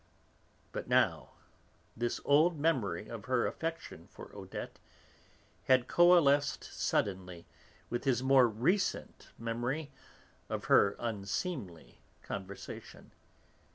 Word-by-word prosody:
But - - -5
now - - +1 0.6
this 120 +1 -2
old 155 +3 +4
memory 115 - 0
of 115 -3 -8
her 130 -2 +1
affection 165 - -5
for - - -13
Odette - - -8 0.9
had 130 -2 +4
coalesced 165 -5 +4
suddenly 90 -3 -2 0.5
with 120 0 -2
his 130 -2 +1
more 130 -2 +6
recent 125 - -1
memory 120 +6 -3 0.6
of - - -4
her 100 0 +4
unseemly 105 - -4 0.2
conversation. 95 0 -8
120 Hz, 95 wpm, -32 LUFS, 100-145 Hz, 0.9 s, more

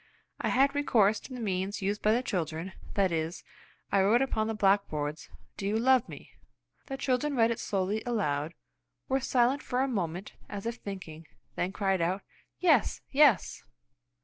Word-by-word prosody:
I - - -1
had 275 +2 +3
recourse 220 -8 +3
to 260 - -11
the - - -6
means 195 -2 -2
used 205 +2 -1
by 215 - +3
the 240 +3 +2
children; 170 -4 -3 0.2
that 195 -3 +2
is, 165 +1 -2 0.5
I 200 - +4
wrote 225 +7 +4
upon 220 -5 -1
the 225 - -2
blackboard, 195 -8 +1 0.4
"Do 195 - -3
you 210 +2 +1
love 255 +1 +3
me?" - - -11 0.6
The 270 - -4
children 270 +2 0
read 230 -1 +4
it 230 - -3
slowly 200 +2 -1
aloud, 165 -9 -1 0.5
were 265 +1 +1
silent 260 +1 +2
for 250 +1 -1
a 270 - +2
moment 185 -5 -3 0.2
as 205 0 -6
if 230 +1 -3
thinking, 165 -7 -8 0.3
then 180 - -1
cried 195 -2 0
out, 185 +4 0 0.3
"Yes! 310 - +3
Yes!" 275 - +4
205 Hz, 170 wpm, -29 LUFS, 185-250 Hz, 0.6 s, I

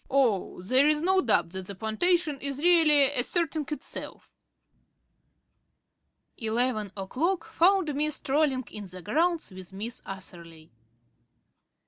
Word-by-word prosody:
Oh, 235 -9 +1
there's 285 - +3
no 380 +1 +3
doubt 220 -8 +1
that 190 0 -7
the 200 - -6
plantation 290 - 0
is 275 -1 -3
really 305 -4 +5
asserting 310 +3 -1
itself." 300 - -7 2.0
Eleven 225 -2 -1
o'clock 320 - -1
found 360 -3 +2
me 300 +2 +1
strolling 280 -2 0
in 205 -2 -7
the 185 0 -9
grounds 335 - 0
with 185 -1 -10
Miss 215 +5 -4
Atherley. 170 -4 -9
270 Hz, 110 wpm, -27 LUFS, 200-315 Hz, 2.0 s, really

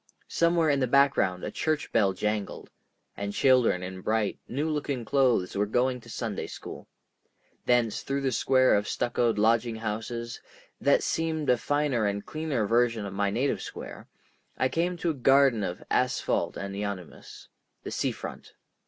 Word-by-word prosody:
Somewhere 170 -2 +2
in 140 - +1
the 130 - +1
background 125 -9 +3
a - - -3
church 155 -1 -1
bell 100 -4 +3
jangled, 105 +1 -3 0.4
and 100 0 -4
children 125 -9 +3
in 95 0 -6
bright, 110 +1 0
new 145 +5 -2
looking 145 -5 -2
clothes 125 -8 +2
were 105 +1 +1
going 125 +3 0
to - - -15
Sunday - - -4
school. - - -9 0.8
Thence 120 -3 +2
through 140 0 -2
a 130 - +2
square 130 +1 +3
of 105 0 +1
stuccoed 120 -2 0
lodging 115 +2 +2
houses, 115 +2 -4 0.4
that - - +3
seemed 160 -3 0
a - - +5
finer 145 -5 0
and 100 0 -3
cleaner 155 -8 -2
version 115 -1 +2
of 100 - -6
my 100 0 0
native 125 +8 0
square, - - -8 0.5
I 130 - +1
came 175 +4 -1
to 170 0 0
a - - -3
garden 135 -4 +4
of 90 -1 -4
asphalt 125 0 0
and 100 +1 -5
euonymus—the 95 -8 -8
Sea - - 0
Front. - - -9
120 Hz, 160 wpm, -27 LUFS, 105-140 Hz, 0.8 s, a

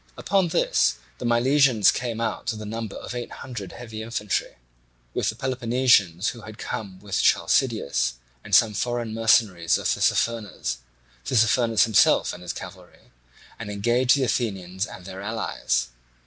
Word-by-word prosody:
Upon 190 -1 +1
this 60 - +2 0.2
the - - -2
Milesians 125 -2 +4
came 120 -3 -3
out 115 - -3
to - - 0
the 110 0 -7
number 110 0 -5
of - - -7
eight 120 -1 -5
hundred 120 -7 -8
heavy 115 -3 -8
infantry, 110 -3 -2 0.6
with - - 0
the 110 - -4
Peloponnesians 120 -7 +2
who 120 - -8
had 110 0 -11
come 100 -4 -5
with 100 -1 -1
Chalcideus, 90 - +2 0.3
and 100 - +2
some 110 0 +5
foreign 120 +1 -2
mercenaries 110 -6 +3
of - - -7
Tissaphernes, 105 - 0 0.5
Tissaphernes 115 - +3
himself 110 -3 +4
and 90 - -10
his 90 - -4
cavalry, - - -11 0.5
and 110 -2 -6
engaged 120 +6 +2
the 135 - +1
Athenians 95 -6 -2
and 90 - -11
their 95 0 -8
allies. 100 - -2
110 Hz, 150 wpm, -24 LUFS, 100-120 Hz, 0.6 s, some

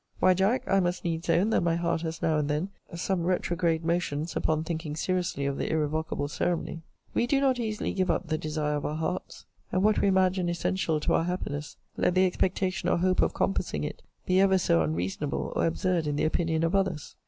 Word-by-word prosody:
Why, 185 - +5
Jack, 195 +7 +2
I 195 - +3
must 180 -1 -1
needs 165 0 -2
own 180 +6 +3
that - - +3
my 170 -1 +1
heart 170 -1 0
has 165 -1 -5
now 155 -2 +2
and 145 -1 -1
then 150 +6 -1 0.3
some 175 +1 -1
retrograde 170 -2 0
motions 165 -2 -1
upon 155 0 +1
thinking 160 -2 -4
seriously 175 -4 -1
of 140 0 -2
the - - -1
irrevocable 155 -1 -1
ceremony. 165 +2 -2 0.3
We 240 - +1
do 275 +2 +3
not 265 -2 +2
easily 215 -2 -2
give 185 -1 0
up - - +1
the 155 0 0
desire 150 -1 -1
of 145 - -4
our 150 - -3
hearts, 170 +3 -4 0.3
and 185 - +1
what 215 0 +3
we - - +3
imagine 185 -2 +2
essential 170 -2 0
to - - +1
our 165 - +2
happiness, 150 -5 -4 0.2
let 180 - +2
the 185 0 +5
expectation 185 +1 0
or - - +3
hope 185 +1 +2
of - - +1
compassing 75 - -1
it - - -5 0.2
be 185 0 +3
ever 190 -1 +5
so 85 - +3
unreasonable 90 - -2
or - - +2
absurd 170 -1 0
in 145 - 0
the 150 - +1
opinion 160 0 0
of 165 +2 +1
others. 190 -6 -1
170 Hz, 210 wpm, -28 LUFS, 155-185 Hz, 0.3 s, Why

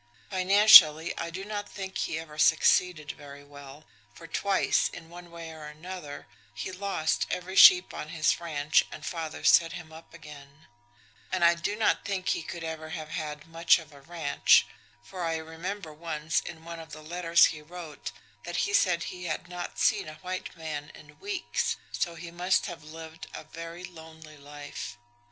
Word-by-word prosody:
Financially, 185 -4 +7
I 170 - -4
do 185 +3 -7
not 205 -1 -5
think 190 -1 -7
he 165 - -2
ever 155 -2 -9
succeeded 160 -1 +3
very 145 0 -12
well, 145 +1 -13 0.3
for 165 - -12
twice, 195 +3 +1
in 165 -1 -12
one 175 0 -11
way 170 -1 -9
or 155 -1 -10
another, 155 -1 -8 0.3
he 110 - -5
lost 185 -4 -1
every 185 +1 -4
sheep 185 -1 +8
on 150 - -6
his 155 -1 +1
ranch 155 -3 +1
and - - -9
father 165 -3 -5
set 165 -1 +5
him 165 -3 -9
up 160 +1 -13
again; 150 -2 -14 0.7
and 185 -2 +2
I 170 - +6
do 170 +4 -3
not 220 0 +1
think 190 -2 -2
he - - 0
could 165 +1 -7
ever 160 -1 -6
have 155 -2 -6
had 150 -3 -5
much 165 0 +3
of 155 -3 -12
a 140 - -15
ranch, 160 -1 +3 0.4
for 180 - -7
I 165 -1 -1
remember 160 +2 -6
once, 155 0 -2
in 165 -1 -10
one 170 0 -7
of 160 -1 -11
the 155 +1 -10
letters 170 +1 +3
he 155 - -10
wrote, 160 -1 -9 0.3
that 175 - -1
he 200 - -4
said 180 -4 +3
he 180 -1 -7
had 165 +2 -4
not 175 0 -7
seen - - +1
a 155 - -10
white 185 -1 -5
man 155 -2 -6
in 150 - -16
weeks, 395 -2 -2
so 170 -2 -2
he 170 +1 -9
must 180 +2 +1
have 175 -5 -7
lived 160 +1 -10
a - - -7
very 165 +3 -9
lonely 160 -3 -12
life. 145 -4 -9
165 Hz, 180 wpm, -28 LUFS, 155-180 Hz, 0.7 s, sheep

